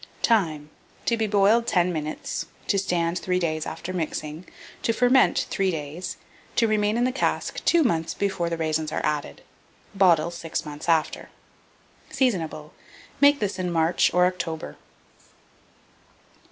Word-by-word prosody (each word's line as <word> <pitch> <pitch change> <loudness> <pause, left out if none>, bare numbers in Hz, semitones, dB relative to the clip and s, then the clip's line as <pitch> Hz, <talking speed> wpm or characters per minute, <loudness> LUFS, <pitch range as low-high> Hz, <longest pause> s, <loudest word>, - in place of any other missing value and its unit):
Time. 160 - +1 0.3
To 235 - +2
be 220 -1 -1
boiled 210 +3 +3
10 180 -1 +2
minutes; 155 -1 -4 0.2
to 200 - +1
stand 175 -2 0
3 180 -1 -1
days 155 -3 -1
after 185 +2 -6
mixing; 155 -1 -4 0.3
to 230 - +1
ferment 250 +3 +3
3 195 -2 +1
days; 160 +2 -5 0.4
to 230 - +3
remain 210 0 +1
in 240 - +2
the 255 - +2
cask 260 - -2
2 340 -1 +4
mouths 165 - 0
before 190 -4 -1
the 165 - -2
raisins 155 -1 -1
are - - -2
added; 150 - -3 0.5
bottle 170 -4 +4
6 165 -2 -4
months 150 +2 -6
after. 160 -2 +1 0.8
Seasonable. 165 - -1 0.5
Make 285 0 +6
this 200 -4 -2
in 180 -1 -1
March 165 0 +2
or 180 0 +4
October. 170 -3 -3
180 Hz, 140 wpm, -25 LUFS, 160-205 Hz, 0.8 s, Make